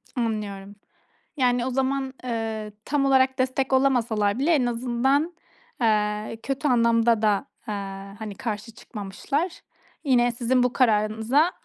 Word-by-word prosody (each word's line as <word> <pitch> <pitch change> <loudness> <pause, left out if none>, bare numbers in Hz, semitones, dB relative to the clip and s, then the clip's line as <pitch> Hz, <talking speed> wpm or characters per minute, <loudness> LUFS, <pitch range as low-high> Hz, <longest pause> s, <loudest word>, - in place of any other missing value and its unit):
Anlıyorum. 205 -4 -3 0.6
Yani, 245 -2 +2
o - - -1
zaman, 265 +1 -1
eee, 225 -3 -3
tam 285 -1 +1
olarak 265 -1 +3
destek 260 +1 0
olamasalar 235 -5 +2
bile 295 +5 +2
en 285 -6 +3
azından, 255 +7 0 0.5
eee, 210 0 0
kötü 275 +2 -1
anlamda 230 -2 +3
da, 210 +1 +2 0.2
eee, 210 - -2 0.5
hani, 215 -2 -6
karşı 215 +1 -4
çıkmamışlar. 275 - -4 0.4
Yine, 245 -4 +3
sizin 245 +1 +1
bu 250 0 +1
kararınıza 225 +6 +2
240 Hz, 125 wpm, -25 LUFS, 215-265 Hz, 0.6 s, olarak